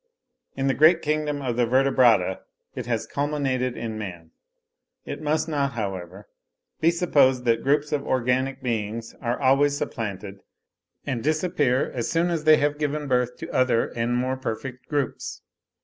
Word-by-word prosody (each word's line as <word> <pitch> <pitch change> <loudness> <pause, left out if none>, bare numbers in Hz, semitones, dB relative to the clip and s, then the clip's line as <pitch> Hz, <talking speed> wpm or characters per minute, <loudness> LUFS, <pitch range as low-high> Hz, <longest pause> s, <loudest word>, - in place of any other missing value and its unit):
In 135 - -2
the 135 - +2
great 160 +4 +5
kingdom 150 -1 -1
of 120 -2 -2
the 120 -1 +2
Vertebrata 120 -7 +3 0.3
it - - -6
has 115 -2 -1
culminated 135 -4 -1
in 110 -2 -4
man. 85 -6 -8 0.7
It - - -6
must 155 +1 0
not, 140 -4 -1
however, 95 -3 -5 0.5
be 160 - +4
supposed 145 -7 +3
that 115 -1 +2
groups 145 +2 +1
of 145 -2 0
organic 130 +2 0
beings 115 -1 -3
are 120 -1 -1
always 140 +1 +3
supplanted, 100 -6 -5 0.6
and 125 -5 -3
disappear 155 -4 +1
as 120 -3 -3
soon 170 +1 +1
as 160 -2 -2
they 155 0 +7
have 145 0 0
given 150 0 -2
birth 125 -1 0
to - - -8
other 130 -3 +2
and 120 +1 -1
more 130 +1 -1
perfect 125 +1 -6
groups. 145 -3 -3
130 Hz, 155 wpm, -24 LUFS, 115-145 Hz, 0.7 s, they